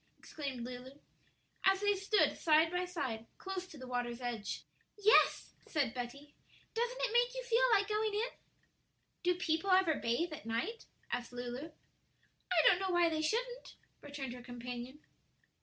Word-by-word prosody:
exclaimed 275 Hz, -6 st, -5 dB
Lulu, 250 Hz, +1 st, -7 dB, 0.7 s
as 385 Hz, 0 st, +4 dB
they 410 Hz, 0 st, +4 dB
stood 400 Hz, +2 st, +2 dB
side 320 Hz, 0 st, +4 dB
by 360 Hz, 0 st, 0 dB
side 265 Hz, -11 st, -4 dB
close 380 Hz, -1 st, -5 dB
to 315 Hz, -, -12 dB
the 260 Hz, -, -8 dB
water's 245 Hz, -1 st, -2 dB
edge. 240 Hz, -4 st, -4 dB, 0.3 s
"Yes," 420 Hz, +2 st, +4 dB
said 275 Hz, -7 st, 0 dB
Betty; 275 Hz, +4 st, -6 dB, 0.4 s
"doesn't 480 Hz, +2 st, -1 dB
it -, -, 0 dB
make 485 Hz, +1 st, +3 dB
you -, -, -3 dB
feel 485 Hz, 0 st, +2 dB
like 405 Hz, 0 st, +2 dB
going 425 Hz, 0 st, 0 dB
in?" 455 Hz, +4 st, 0 dB, 0.9 s
"Do 360 Hz, 0 st, +2 dB
people 345 Hz, +1 st, 0 dB
ever 370 Hz, -3 st, +5 dB
bathe 300 Hz, +6 st, -1 dB
at 260 Hz, -, -8 dB
night?" 300 Hz, -, -2 dB, 0.2 s
asked 245 Hz, 0 st, -2 dB
Lulu. 245 Hz, +5 st, -5 dB, 0.8 s
"I 345 Hz, -3 st, +5 dB
don't 360 Hz, -, +6 dB
know 385 Hz, -1 st, -1 dB
why 350 Hz, -1 st, +4 dB
they 315 Hz, -1 st, -1 dB
shouldn't," 485 Hz, +9 st, -2 dB, 0.3 s
returned 280 Hz, -4 st, -6 dB
her 250 Hz, -, -9 dB
companion. 245 Hz, +3 st, -7 dB
320 Hz, 155 wpm, -34 LUFS, 250-395 Hz, 0.9 s, don't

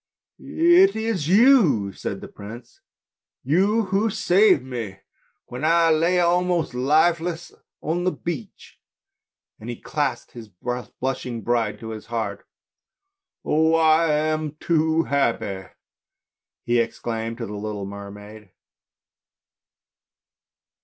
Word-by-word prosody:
" -, -, -60 dB
It 345 Hz, +4 st, +4 dB
is 220 Hz, -9 st, -2 dB
you," 195 Hz, -, +4 dB
said -, -, -5 dB
the -, -, -8 dB
prince, 115 Hz, +4 st, -12 dB, 0.3 s
" -, -, -70 dB
you 205 Hz, +6 st, +3 dB
who 210 Hz, +3 st, +2 dB
saved 195 Hz, -4 st, +3 dB
me 115 Hz, -7 st, -6 dB, 0.5 s
when 125 Hz, +4 st, -8 dB
I 165 Hz, +1 st, +4 dB
lay 170 Hz, +3 st, +2 dB
almost 175 Hz, -3 st, +1 dB
lifeless 160 Hz, +6 st, +1 dB, 0.3 s
on 170 Hz, +3 st, -2 dB
the 185 Hz, -, +1 dB
beach? 160 Hz, -12 st, -7 dB, 0.4 s
" -, -, -64 dB
and 110 Hz, -, -9 dB
he 120 Hz, -, -4 dB
clasped -, -, -3 dB
his 115 Hz, -3 st, -11 dB
blushing 125 Hz, +3 st, -5 dB
bride 115 Hz, -1 st, 0 dB
to 110 Hz, -, -7 dB
his 110 Hz, -1 st, -8 dB
heart. 115 Hz, -1 st, -4 dB, 1.0 s
"Oh! 160 Hz, +1 st, +3 dB
I 160 Hz, 0 st, +4 dB
am 155 Hz, 0 st, -1 dB
too 160 Hz, -1 st, +1 dB
happy!" 110 Hz, -, -1 dB, 1.0 s
he 120 Hz, 0 st, +2 dB
exclaimed 115 Hz, 0 st, -3 dB
to 120 Hz, -, -4 dB
the 105 Hz, -, -7 dB
little 105 Hz, -1 st, -5 dB
mermaid. 105 Hz, +1 st, -10 dB
145 Hz, 120 wpm, -23 LUFS, 115-170 Hz, 1.0 s, It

